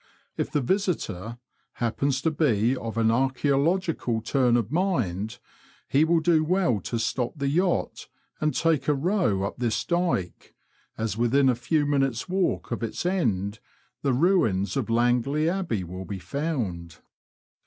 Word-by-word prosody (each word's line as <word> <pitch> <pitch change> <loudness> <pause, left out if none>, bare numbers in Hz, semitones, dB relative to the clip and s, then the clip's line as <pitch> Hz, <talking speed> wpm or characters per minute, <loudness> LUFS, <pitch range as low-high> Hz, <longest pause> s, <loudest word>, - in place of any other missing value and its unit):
If - - -2
the 150 - 0
visitor 125 - -2 0.4
happens 130 +4 -1
to 160 - +2
be 125 -6 +2
of 115 -3 -5
an 115 -1 +3
archselogical 135 0 +1
turn 125 -2 +3
of 115 -1 -2
mind, 120 - -1 0.5
he 140 +3 +3
will 165 0 +3
do 160 -1 +3
well 170 - +1
to 115 +5 -4
stop 120 +2 -1
the 140 -1 -1
yacht 175 +5 0 0.3
and 155 0 +1
take 160 -5 +1
a 150 - +3
row 155 - +1
up 100 - -3
this 120 -3 0
dyke, 170 - -2 0.4
as 110 -1 -2
within 130 +3 +3
a - - +4
few 145 +5 0
minutes' 135 -3 0
walk 185 -6 -1
of 115 - -2
its 115 +8 -4
end 110 - 0 0.4
the 140 - +1
ruins 120 - +2
of 130 -5 -1
Langley 120 +6 +2
Abl»ey 170 - -1
will 90 +2 -7
be 100 - -5
found. 95 - -3
130 Hz, 150 wpm, -26 LUFS, 115-160 Hz, 0.5 s, a